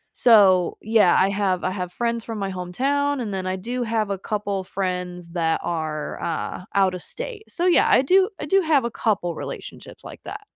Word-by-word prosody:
so 195 Hz, -7 st, +5 dB
yeah, 215 Hz, -5 st, +4 dB
I 190 Hz, -, +4 dB
have 195 Hz, -2 st, 0 dB
I 185 Hz, -, 0 dB
have 180 Hz, -2 st, -4 dB
friends 235 Hz, 0 st, -2 dB
from 225 Hz, -2 st, -6 dB
my 195 Hz, -1 st, -3 dB
hometown 270 Hz, +11 st, -1 dB
and 210 Hz, -4 st, -4 dB
then 185 Hz, -1 st, -3 dB
I 185 Hz, -, -1 dB
do 240 Hz, +6 st, -4 dB
have 220 Hz, -3 st, -1 dB
a 195 Hz, -, -1 dB
couple 200 Hz, -1 st, -3 dB
friends 180 Hz, -2 st, -4 dB
that 165 Hz, -2 st, 0 dB
are, 155 Hz, -3 st, -3 dB
uh, 170 Hz, +2 st, -3 dB
out 190 Hz, -2 st, +3 dB
of 180 Hz, -, -6 dB
state. 465 Hz, -, -8 dB
So, 350 Hz, -, -2 dB
yeah, 360 Hz, -, +4 dB
I -, -, +5 dB
do 375 Hz, +7 st, +4 dB
I -, -, -4 dB
do 390 Hz, +6 st, +3 dB
have 300 Hz, -7 st, +2 dB
a 235 Hz, -, -2 dB
couple 195 Hz, -8 st, -1 dB
relationships -, -, -8 dB
like -, -, -11 dB
that. 420 Hz, +1 st, -7 dB
200 Hz, 205 wpm, -23 LUFS, 180-245 Hz, -, so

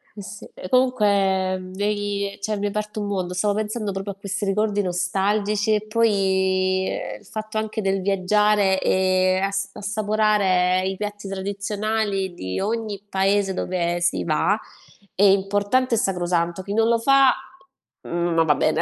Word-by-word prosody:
Eh, 205 Hz, -, -8 dB
sì. 200 Hz, +1 st, -10 dB
E 185 Hz, -, -9 dB
comunque 200 Hz, -7 st, +2 dB
mi 185 Hz, +2 st, -6 dB
hai 205 Hz, -1 st, -2 dB
cioè 215 Hz, +1 st, -1 dB
mi 200 Hz, -, -4 dB
hai -, -, +1 dB
aperto 210 Hz, 0 st, -4 dB
un 205 Hz, -, -3 dB
mondo, 185 Hz, -3 st, -2 dB
stavo 205 Hz, +3 st, +1 dB
pensando 215 Hz, 0 st, -2 dB
proprio 195 Hz, +1 st, -4 dB
a 195 Hz, -, -27 dB
questi 200 Hz, +1 st, -4 dB
ricordi 205 Hz, +1 st, +1 dB
nostalgici 200 Hz, +4 st, 0 dB
e 210 Hz, 0 st, -2 dB
poi, 190 Hz, -4 st, +1 dB
ehm, -, -, -5 dB
il -, -, -22 dB
fatto 215 Hz, +2 st, -6 dB
anche 215 Hz, 0 st, -2 dB
del 195 Hz, 0 st, 0 dB
viaggiare 200 Hz, +1 st, +2 dB
e 185 Hz, 0 st, +2 dB
ass 195 Hz, 0 st, -1 dB
assaporare 205 Hz, -3 st, +1 dB
i 190 Hz, -, -2 dB
piatti 205 Hz, 0 st, -6 dB
tradizionali 200 Hz, 0 st, -2 dB
di 95 Hz, -, -4 dB
ogni 215 Hz, -1 st, -3 dB
paese 195 Hz, 0 st, +1 dB
dove 175 Hz, -2 st, -2 dB
si 175 Hz, -, +1 dB
va, 170 Hz, +6 st, +1 dB, 0.6 s
è 195 Hz, -, +1 dB
importante 205 Hz, +5 st, +3 dB
e -, -, -1 dB
sacrosanto. 175 Hz, -4 st, 0 dB
Chi 200 Hz, +1 st, -5 dB
non 225 Hz, +1 st, +3 dB
lo 235 Hz, -, +3 dB
fa, 275 Hz, +1 st, +5 dB, 0.7 s
mhmm, 170 Hz, 0 st, -2 dB
non 165 Hz, 0 st, +3 dB
va 150 Hz, -2 st, +3 dB
bene, -, -, +1 dB
200 Hz, 165 wpm, -23 LUFS, 190-210 Hz, 0.7 s, fa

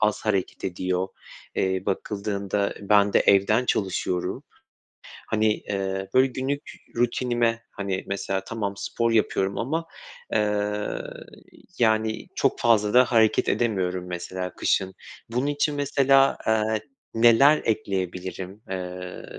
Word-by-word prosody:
az 105 Hz, 0 st, +1 dB
hareket 100 Hz, -4 st, -1 dB
ediyor. 90 Hz, 0 st, -1 dB, 0.5 s
Eee, 95 Hz, -1 st, 0 dB
bakıldığında 100 Hz, 0 st, -2 dB
ben 100 Hz, 0 st, +3 dB
de -, -, +5 dB
evden 105 Hz, +5 st, +4 dB
çalışıyorum. 95 Hz, -2 st, 0 dB, 1.1 s
Hani, 110 Hz, -1 st, +2 dB
eee, 95 Hz, -1 st, -3 dB
böyle 130 Hz, +1 st, +6 dB
günlük 135 Hz, +3 st, -3 dB, 0.3 s
rutinime, 120 Hz, -1 st, +1 dB
hani, 95 Hz, -2 st, -3 dB
mesela 95 Hz, -1 st, -2 dB
tamam, 105 Hz, -3 st, -3 dB
spor 115 Hz, +2 st, -1 dB
yapıyorum 100 Hz, -3 st, +1 dB
ama, 160 Hz, +8 st, -2 dB, 0.5 s
eee, 105 Hz, -1 st, 0 dB, 0.8 s
yani, 110 Hz, -1 st, +1 dB
çok -, -, +1 dB
fazla 105 Hz, -2 st, +3 dB
da 125 Hz, +1 st, +8 dB
hareket 115 Hz, -3 st, +3 dB
edemiyorum 95 Hz, -6 st, 0 dB
mesela 90 Hz, +1 st, -5 dB
kışın. 95 Hz, -1 st, 0 dB, 0.4 s
Bunun 125 Hz, +4 st, 0 dB
için 145 Hz, 0 st, 0 dB
mesela, 135 Hz, -1 st, +3 dB
eee, 110 Hz, 0 st, +1 dB, 0.3 s
neler 120 Hz, +6 st, +6 dB
ekleyebilirim, 95 Hz, -1 st, -3 dB
eee, 90 Hz, -1 st, -6 dB
105 Hz, 110 wpm, -25 LUFS, 95-115 Hz, 1.1 s, da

